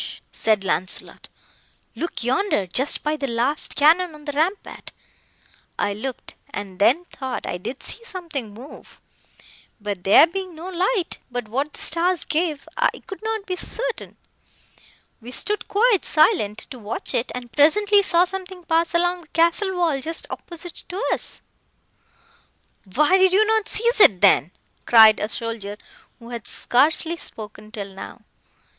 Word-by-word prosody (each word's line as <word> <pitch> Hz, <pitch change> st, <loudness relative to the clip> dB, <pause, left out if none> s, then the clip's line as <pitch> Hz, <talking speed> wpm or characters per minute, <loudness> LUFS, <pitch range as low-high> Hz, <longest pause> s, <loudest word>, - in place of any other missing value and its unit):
said 215 Hz, -3 st, +1 dB
Launcelot,—look 190 Hz, -, -5 dB
yonder—just 255 Hz, -, 0 dB
by 300 Hz, +1 st, 0 dB
the 280 Hz, -2 st, -3 dB
last 245 Hz, +5 st, -1 dB
cannon 325 Hz, +3 st, +4 dB
on 300 Hz, -1 st, -15 dB
the 290 Hz, -, -3 dB
rampart! 325 Hz, +8 st, -3 dB, 0.9 s
I 205 Hz, -, 0 dB
looked, 255 Hz, +5 st, -7 dB, 0.2 s
and 195 Hz, -2 st, -7 dB
then 275 Hz, -, +3 dB
thought 265 Hz, -6 st, -6 dB
I 175 Hz, -, -4 dB
did 255 Hz, +9 st, -7 dB
see 465 Hz, -, -4 dB
something 330 Hz, -, -5 dB
move; 245 Hz, +8 st, -13 dB, 0.8 s
but 205 Hz, -4 st, -5 dB
there 200 Hz, +10 st, +7 dB
being 370 Hz, 0 st, -5 dB
no 335 Hz, +4 st, -8 dB
light, 370 Hz, +1 st, -1 dB
but 245 Hz, -2 st, -5 dB
what 275 Hz, +7 st, -3 dB
the -, -, -11 dB
stars 345 Hz, +2 st, +1 dB
gave, 315 Hz, -2 st, -1 dB
I -, -, +3 dB, 0.2 s
could 390 Hz, -, -9 dB
not 440 Hz, -2 st, -3 dB
be 365 Hz, -, -2 dB
certain. 485 Hz, +6 st, -3 dB, 1.0 s
We 240 Hz, +2 st, -10 dB
stood 420 Hz, +10 st, -1 dB
quite 425 Hz, -1 st, +2 dB
silent, 305 Hz, -, +3 dB
to 255 Hz, -, -8 dB
watch 215 Hz, +1 st, -2 dB
it, 235 Hz, -, -1 dB
and 245 Hz, -1 st, -8 dB
presently 405 Hz, +8 st, +4 dB
saw 350 Hz, -3 st, +3 dB
something 370 Hz, 0 st, -3 dB
pass 335 Hz, +1 st, +1 dB
along 350 Hz, +1 st, +1 dB
the 320 Hz, -, -19 dB
castle 340 Hz, +5 st, +1 dB
wall 325 Hz, -6 st, 0 dB
just 325 Hz, +4 st, -5 dB
opposite 345 Hz, 0 st, -8 dB
to 365 Hz, +3 st, -5 dB
us!" -, -, -5 dB, 1.5 s
"Why 300 Hz, -, +4 dB
did 375 Hz, -1 st, +4 dB
you 425 Hz, +3 st, +5 dB
not 440 Hz, -1 st, +1 dB
seize 470 Hz, +1 st, +2 dB
it, 200 Hz, -, +7 dB
then?" 190 Hz, -6 st, +5 dB, 0.4 s
cried 220 Hz, -2 st, +7 dB
a 210 Hz, -, -2 dB
soldier, 225 Hz, -3 st, -5 dB, 0.4 s
who 235 Hz, -1 st, -13 dB
had 235 Hz, -3 st, -6 dB
scarcely 315 Hz, +6 st, +1 dB
spoken 215 Hz, -5 st, -8 dB
till 200 Hz, -3 st, -7 dB
now. 195 Hz, -, -10 dB
310 Hz, 150 wpm, -22 LUFS, 230-365 Hz, 1.5 s, there